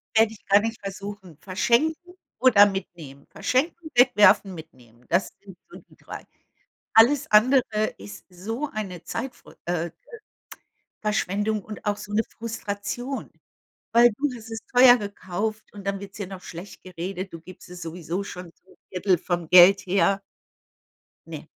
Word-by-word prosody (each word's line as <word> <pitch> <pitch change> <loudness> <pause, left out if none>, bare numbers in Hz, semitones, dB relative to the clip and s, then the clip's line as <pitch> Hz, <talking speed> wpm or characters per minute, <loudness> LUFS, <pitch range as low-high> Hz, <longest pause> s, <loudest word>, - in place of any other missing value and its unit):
Täte 220 0 +4
ich 210 - -18
gar 200 +1 +5
nicht 225 +1 -4
versuchen, 195 -4 -8
verschenken 310 - 0 0.2
oder 220 -6 +7
mitnehmen. 170 -8 -6
Verschenken, 310 - -2
wegwerfen, 210 -6 +5
mitnehmen, 125 -7 -14
das 175 +3 +1
sind 190 -3 -14
so - - -12
die - - -23
3. - - -10 0.7
Alles 270 +6 +5
andere 215 -1 +4
ist 100 +1 -11
so 225 +11 -5
eine 190 -5 -5
Zeitver 250 +3 -7
äh, 170 -1 -2 1.1
Verschwendung 210 0 -1
und 215 0 -10
auch 205 -1 0
so 205 - -10
'ne 220 - +2 0.2
Frustration. 230 +3 -5 0.6
Weil 240 +1 +7
du 290 +1 0
hast 225 0 -11
es 225 - -4
teuer 250 0 +8
gekauft 205 +1 -4
und 200 -1 -11
dann 195 0 -2
wird's 200 0 -10
dir 200 -3 -5
noch 190 -1 -9
schlecht 175 +4 -10
geredet. 185 +1 -6
Du 165 - -9
gibst 185 +1 -14
es 180 0 -10
sowieso 170 +3 -4
schon 180 -3 -9
so 190 - -24
'n - - -20 0.2
1/3 185 0 +1
vom 175 -3 -3
Geld 185 +2 +8
her. 195 +1 +2 1.1
Ne. - - -9
200 Hz, 150 wpm, -24 LUFS, 180-225 Hz, 1.1 s, teuer